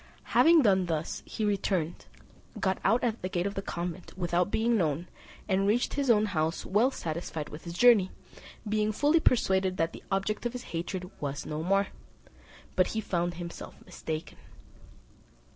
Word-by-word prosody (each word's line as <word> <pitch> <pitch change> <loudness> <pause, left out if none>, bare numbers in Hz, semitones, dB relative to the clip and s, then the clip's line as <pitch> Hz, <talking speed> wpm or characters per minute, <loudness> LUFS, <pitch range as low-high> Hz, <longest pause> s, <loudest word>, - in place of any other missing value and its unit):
Having 330 -2 +6
done 190 -4 +3
thus, 160 -1 -2
he 220 - -2
returned, 190 -5 -1 0.5
got 190 -1 0
out 225 +5 +3
at 235 -2 -1
the 185 - -3
gate 175 -1 -1
of 200 - -1
the 195 - -3
convent 175 -1 -5
without 175 0 +1
being 230 +3 +2
known, 165 -3 0 0.4
and 195 0 +2
reached 230 +4 +1
his 280 -2 -1
own 215 -2 +5
house 165 -5 -1
well 215 +7 +3
satisfied 160 - -4
with 150 +3 -10
his 170 0 -6
journey, 225 -6 +6 0.6
being 215 0 +1
fully 295 +9 +3
persuaded 190 -9 +2
that 165 0 0
the - - -9
object 195 +2 -1
of 240 - -7
his 250 - -6
hatred 180 +2 -4
was 145 -1 -3
no 155 0 -3
more; 195 +3 +2 0.9
but 185 - +4
he - - +2
found 175 -4 -1
himself 170 0 -7
mistaken. 155 0 -6
190 Hz, 165 wpm, -29 LUFS, 170-215 Hz, 0.9 s, Having